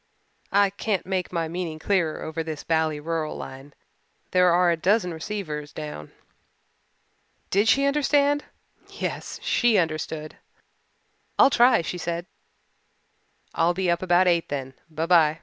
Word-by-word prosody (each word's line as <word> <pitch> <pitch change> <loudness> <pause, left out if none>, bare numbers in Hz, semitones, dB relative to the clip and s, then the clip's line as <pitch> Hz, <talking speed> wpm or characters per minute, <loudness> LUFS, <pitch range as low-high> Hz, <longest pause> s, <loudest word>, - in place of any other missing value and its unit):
I 200 -1 +4
can't 200 0 -2
make 185 -1 -2
my 165 -2 -1
meaning 165 -1 -4
clearer 170 -1 0
over 160 +1 -4
this 160 -2 -6
bally 160 -2 0
rural 160 0 -3
line. 135 +2 -10 0.6
There 180 -1 +4
are 175 0 +4
a - - +2
dozen 180 +2 +1
receivers 155 -4 -5
down." 75 0 -7 1.4
Did 200 +3 +3
she 275 +4 +4
understand! 290 0 +2 0.4
Yes, - - -5
she 240 -4 +3
understood. 155 -2 -2 1.0
"I'll - - +6
try," 240 -5 +5
she 180 +2 -4
said. 170 0 -3 1.3
"I'll 170 +1 +2
be 185 -1 +1
up 170 - 0
about 180 0 +3
eight 170 -2 +2
then. 135 -2 -4 0.2
By 160 +1 -3
by." 165 -3 +4
170 Hz, 135 wpm, -25 LUFS, 155-195 Hz, 1.4 s, I'll